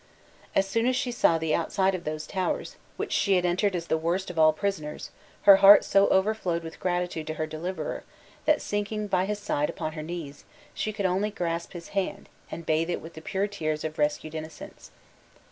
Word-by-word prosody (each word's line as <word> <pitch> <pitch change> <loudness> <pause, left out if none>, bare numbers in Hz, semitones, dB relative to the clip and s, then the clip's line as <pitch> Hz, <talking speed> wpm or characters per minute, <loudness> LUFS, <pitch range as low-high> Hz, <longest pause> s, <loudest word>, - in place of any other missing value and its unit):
As 195 - +3
soon 230 +4 +1
as 255 - +2
she 250 - -1
saw 170 -8 +3
the 160 -1 -1
outside 190 +3 +1
of 180 -2 -5
those 155 0 -3
towers, 185 -2 -2 0.2
which - - -3
she 200 -2 +3
had 180 -1 +2
entered 185 +3 +1
as 170 -1 -3
the 160 - 0
worst 175 +4 -1
of 165 - -4
all 155 0 +7
prisoners, 155 -3 -4 0.3
her 200 -1 +9
heart 200 +1 +9
so 200 0 +4
overflowed 190 -4 +1
with 165 0 -9
gratitude 175 -3 -2
to 155 - -3
her 155 - -2
deliverer, 160 +1 -4 0.4
that 305 -1 +3
sinking 205 +1 -2
by 185 -2 +1
his 210 +1 -2
side 175 -8 -1
upon 155 - -4
her 155 0 -6
knees, 155 -3 -7 0.3
she 215 - -2
could 205 -2 -3
only 190 +3 +1
grasp 170 -4 -3
his 175 -2 -9
hand, 195 -2 -3 0.2
and 165 0 -7
bathe 160 +2 +1
it 175 - -1
with 165 - -11
the 160 - -10
pure 190 +4 -1
tears 155 -7 -3
of 155 0 -5
rescued 150 +1 0
innocence. 160 0 -9
175 Hz, 205 wpm, -27 LUFS, 160-200 Hz, 0.4 s, her